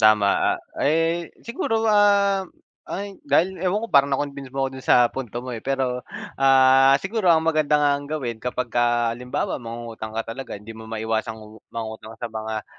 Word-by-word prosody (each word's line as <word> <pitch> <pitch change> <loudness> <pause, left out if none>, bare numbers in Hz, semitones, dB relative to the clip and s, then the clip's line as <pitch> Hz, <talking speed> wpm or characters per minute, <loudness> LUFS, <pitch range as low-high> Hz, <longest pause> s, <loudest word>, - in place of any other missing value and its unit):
tama, 110 -2 +4
ah, - - -12 0.2
eh, 165 +2 +1 0.2
siguro, 225 -1 -1
ah, 200 -3 +3 0.4
ay, 200 0 -6
dahil 185 +1 +2
ewan 190 +4 0
ko 230 - -6
parang 140 0 +6
na-convince 140 -1 -3
mo 135 +1 -2
ako - - 0
dun 130 - -8
sa - - +8 0.2
punto 120 -3 -6
mo 125 - -5
eh. 115 - -5
Pero, 130 -2 -1 0.4
ah, 135 0 +6
siguro 195 +3 -1
ang 160 -1 +5
maganda 155 -2 +2
nga 145 -1 +3
ang 140 0 -3
gawin 125 -8 -4
kapagka 120 -1 0
halimbawa 125 +3 -3
mangungutang 115 -2 -7
ka 115 - -1
talaga 135 -3 -7
hindi 105 +3 -10
mo 110 0 -11
maiwasang 110 0 -2
umu 110 0 -13
mangutang 110 -1 -7
sa 115 -1 -6
mga 110 0 -4
135 Hz, 180 wpm, -23 LUFS, 115-160 Hz, 0.4 s, sa